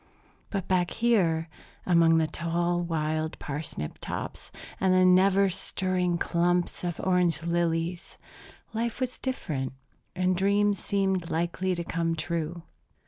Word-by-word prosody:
But 195 -3 -3
back 180 -2 +2
here, 185 -9 +2 0.4
among 165 -2 +5
the 160 - +3
tall 170 +2 -1
wild 155 -2 -1
parsnip 140 - -5
tops - - -5 0.3
and 190 0 +3
the 185 0 +5
never 190 +2 +5
stirring 185 -1 -1
clumps 175 +1 0
of 175 -2 -3
orange 180 -3 +1
lilies, 170 0 -1 0.6
life 230 +1 -2
was 255 -1 -2
different, 150 - -3 0.4
and 185 0 +2
dreams 200 +1 +2
seemed 190 -3 0
likely 175 +3 -1
to 170 - -3
come 165 0 -1
true. 165 +1 -3
175 Hz, 125 wpm, -28 LUFS, 165-185 Hz, 0.6 s, among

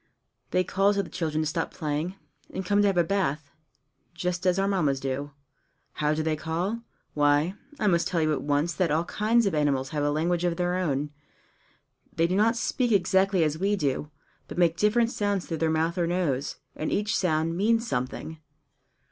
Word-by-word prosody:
They 185 - +2
call 195 +3 +2
to 200 - +1
the 175 - -11
children 155 -2 -1
to - - -1
stop 165 +2 -2
playing, 155 +4 -3 0.4
and 190 - -4
come 205 +3 +2
and 205 - +4
have 195 -2 +1
a 175 - +5
bath 155 -6 -1 0.6
just 180 +1 -2
as 180 0 +3
our 195 0 +2
Mammas 155 -9 +1
do. 135 +2 -3 0.7
How 150 0 +2
do 155 - -1
they 155 0 0
call? 175 +9 -2 0.3
Why, 145 +4 +3 0.3
I 215 - 0
must 170 -4 +3
tell 170 - 0
you 155 -1 +2
at 145 - -2
once 145 +4 0
that 170 +2 +1
all 155 +3 +2
kinds 220 +5 +2
of 195 - +1
animals 140 -3 +1
have 150 -1 -2
a 145 - +2
language 170 +4 0
of 175 -1 0
their 180 0 0
own. 150 -5 -1 1.0
They 165 - +3
do 180 +2 0
not 220 +4 +3
speak 245 +1 0
exactly 190 -2 +3
as 155 0 -1
we 200 +2 +2
do, 150 -3 -1 0.4
but - - -8
make 170 -2 +3
different 230 +4 +2
sounds 205 -4 -1
through 165 - -3
their 160 0 +1
mouth 165 +3 0
or 170 - +1
nose, 160 -6 -1 0.2
and 155 - -3
each 210 +1 0
sound 165 -2 +1
means 225 +5 +2
something. 130 - -3
170 Hz, 200 wpm, -27 LUFS, 150-195 Hz, 1.0 s, a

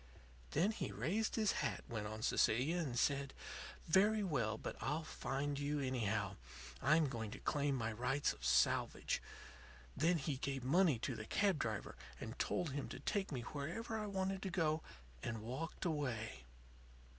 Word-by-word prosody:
"Then 180 +8 +3
he - - -3
raised 215 +6 0
his 215 -3 +3
hat," - - -1
went 110 -6 -3
on 110 +1 -5
Cecilia, 135 +10 +3
"and 135 -8 -1
said: 140 +1 +1 0.5
'Very 205 +5 +5
well. 115 - 0
But - - -4
I'll 150 +4 0
find 140 -1 -2
you, 145 +1 0
anyhow. 110 -7 0 0.4
I'm 155 +3 +5
going 115 -5 -3
to - - -6
claim 145 -2 +1
my 115 -3 -1
rights 125 +6 +1
of - - -15
salvage.' - - +3 0.7
Then 170 +4 +3
he 140 -2 -1
gave 135 -2 -2
money 160 +1 +4
to 125 +3 -2
the 110 - -5
cab 195 -6 +3
driver 110 -5 -2 0.2
and 115 +4 -6
told 175 -5 0
him 140 0 -3
to - - -6
take 195 +7 -1
me 130 -4 -2
where 145 - -4 0.2
I 215 -1 -2
wanted 195 -1 -1
to 190 - -2
go, 160 -3 +1 0.4
and 110 -2 -3
walked 135 +11 -4
away. 120 - -2
140 Hz, 165 wpm, -39 LUFS, 120-170 Hz, 0.7 s, Very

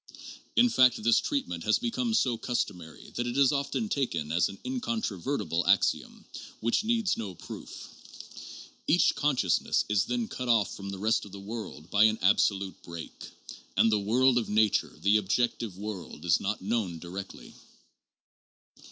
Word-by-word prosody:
In 245 - +6
fact 125 - +4
this 115 0 +5
treatment 90 -12 -3
has 110 - +3
become 235 -1 -1
so 125 - +2
customary 90 -9 -4
that 120 0 -2
it 120 +2 -3
is 140 -2 +5
often 140 +10 -1
taken 115 - -2
as 85 +1 +2
an 100 - -9
incontrovertible 140 - -2
axiom - - +1 0.3
which 115 - +1
needs 225 -3 +1
no 100 -5 -5
proof. - - -9 1.2
Each 175 +4 +4
consciousness 130 - +1
is 105 0 +2
then 120 -1 -2
cut 125 -1 -5
off 110 -4 +2
from 100 0 -7
the 100 - -5
rest 110 +3 +1
of 100 - -12
the 100 - -9
world 100 -6 -8
by 105 +1 +5
an 110 0 +3
absolute 95 0 +2
break. 85 -1 -9 0.5
And 115 - +5
the 105 - +3
world 120 +5 +3
of 115 - -4
nature, 105 0 +1
the 105 +2 +5
objective 105 0 -1
world, 95 -6 -7
is 85 -1 +4
not 105 -1 -3
known 100 -5 -1
directly. 90 +4 -8
110 Hz, 155 wpm, -28 LUFS, 95-130 Hz, 1.2 s, In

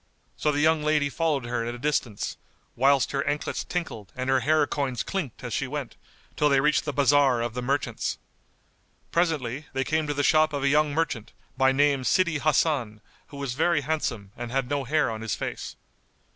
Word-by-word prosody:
So 150 - +1
the 145 0 0
young 160 0 +3
lady 150 -1 +2
followed 155 -6 0
her 120 -1 -2
at 120 +1 -4
a - - -8
distance, 125 -6 -1 0.4
whilst 135 0 +3
her 140 0 0
anklets 145 +1 -2
tinkled 160 - -5
and 130 +1 -1
her 135 - +4
hair 150 +4 +3
coins[FN#191] 135 -4 -2
clinked 170 - -4
as 120 - -4
she 135 - -1
went, 140 -2 -5 0.4
till 150 - +3
they 140 -1 +4
reached 150 +3 +2
the 150 - -1
bazar 140 -2 +4
of 115 -1 -2
the 125 - -3
merchants. 140 +3 -1 0.9
Presently, 150 -5 0
they 135 0 0
came 155 +2 0
to 145 - -2
the 145 - 0
shop 155 +1 +4
of 140 -1 -2
a 140 - +3
young 150 +1 +3
merchant, 145 -8 -2 0.2
by 130 0 +4
name 140 0 +3
Sídí 170 +3 +2
Hasan 140 -8 +1 0.3
who 140 - -11
was 140 -3 -3
very 155 +1 +2
handsome[FN#192] 115 -10 -2
and 120 0 -5
had 135 -1 0
no 140 -2 0
hair 150 -1 +1
on 110 0 -5
his 110 -2 -2
face. - - -5
140 Hz, 200 wpm, -26 LUFS, 125-150 Hz, 0.9 s, her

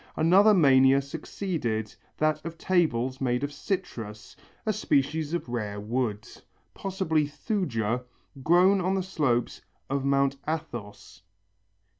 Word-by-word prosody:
Another 195 +7 +5
mania 135 -4 +6
succeeded, 140 - -3 0.2
that 155 0 +1
of 165 0 -7
tables 130 -9 0
made 125 0 0
of 145 0 -3
citrus, 120 - -5 0.3
a 215 - +1
species 155 0 0
of 175 - -4
rare 105 -4 -3
wood, 110 -1 -2 0.5
possibly 170 -6 -1
Thuja, 125 - -2 0.4
grown 180 +6 +4
on 185 +2 0
the 190 - 0
slopes 145 -10 -1 0.3
of 140 -1 0
Mount 140 0 +2
Athos. 110 - -6
140 Hz, 115 wpm, -27 LUFS, 120-175 Hz, 0.5 s, mania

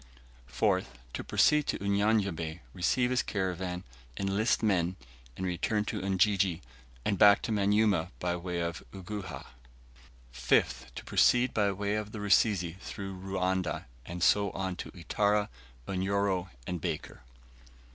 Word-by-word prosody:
4th. 65 - +1 0.3
To - - -4
proceed 150 -1 +3
to - - 0
Unyanyembe, 100 -5 0
receive 125 +7 +1
his 125 -3 +3
caravan, 90 -2 -3 0.3
enlist 100 +5 +1
men, 90 -4 +2 0.4
and 95 - -3
return 105 +4 0
to 105 - -3
Ujiji, 95 -2 +2 0.4
and 100 - 0
back 100 -1 +7
to 115 - -2
Manyuema 100 -4 +2
by 90 -1 -1
way 90 0 -3
of 85 0 -3
Uguhha. 95 -2 -6 0.9
5th. - - +1
To - - -6
proceed 125 +1 +3
by 100 -2 +2
way 100 +1 -2
of 105 0 -3
the 110 - -5
Rusizi 100 -4 +2
through 95 -1 -6
Ruanda, 95 -2 -2 0.2
and 85 +6 -5
so 100 -1 +4
on 95 -1 -3
to - - -6
Itara, 105 +4 +1 0.4
Unyoro, 95 -1 0 0.2
and 90 +1 -4
Baker. - - -4
95 Hz, 135 wpm, -30 LUFS, 90-105 Hz, 0.9 s, back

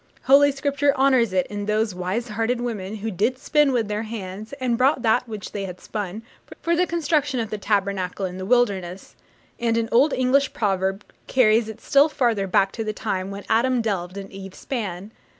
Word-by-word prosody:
Holy 285 +2 +6
Scripture 280 0 +1
honours 260 -5 +3
it 185 -1 +1
in 205 0 -5
those 215 -1 +1
'wise 185 +7 -3
hearted 225 +3 -1
women' 215 -4 -4
who 220 +1 -4
'did 220 +7 0
spin 295 +1 +2
with 235 -4 0
their 210 +1 -2
hands, 215 -2 -7
and 255 -4 -1
brought 255 +1 +2
that 240 +2 +2
which 215 -3 -6
they 200 -1 -4
had 180 -1 -8
spun' 210 +1 -5 0.4
for 340 0 +1
the 360 +1 +2
construction 295 -5 0
of 225 -2 -3
the 215 - -2
Tabernacle 200 -2 -1
in 185 0 -6
the 185 - -4
wilderness: 195 -7 0 0.4
and 230 -1 +1
an 230 -1 0
old 270 +6 +4
English 260 +2 +2
proverb 195 -1 -1 0.2
carries 225 -3 +3
it 220 - -8
still 280 +3 +4
farther 230 -9 0
back 195 +1 +2
to 225 - -4
the 215 -1 -3
time 195 -3 -3
'when 200 0 -7
Adam 245 +3 +2
delved 195 -5 -2
and 195 -1 -7
Eve 195 -1 -9
span.' 205 -6 -5
220 Hz, 195 wpm, -23 LUFS, 195-255 Hz, 0.4 s, Holy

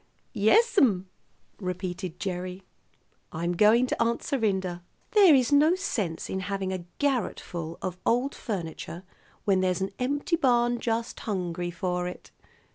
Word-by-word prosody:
"Yes'm," 225 - +4 0.5
repeated 180 -2 -4
Gerry. 185 -1 -4 0.7
"I'm 170 +2 -2
going 215 +6 +5
to 250 - -2
Aunt 235 0 -1
Serinda. 190 -8 -1 0.3
There 390 -8 +7
is 255 0 +2
no 300 +4 +5
sense 205 - -2
in 190 - -3
having 195 -1 -2
a 180 -2 -5
garret 270 -7 0
full 165 -1 -6
of 185 -1 -4
old 250 +4 +1
furniture 170 -4 -5 0.4
when 190 -2 +3
there's 185 -1 0
an 190 +1 -1
empty 285 +6 0
barn 240 -4 +2
just 230 0 -2
hungry 180 -4 -3
for 180 0 -2
it. 180 - -9
195 Hz, 135 wpm, -27 LUFS, 180-245 Hz, 0.7 s, There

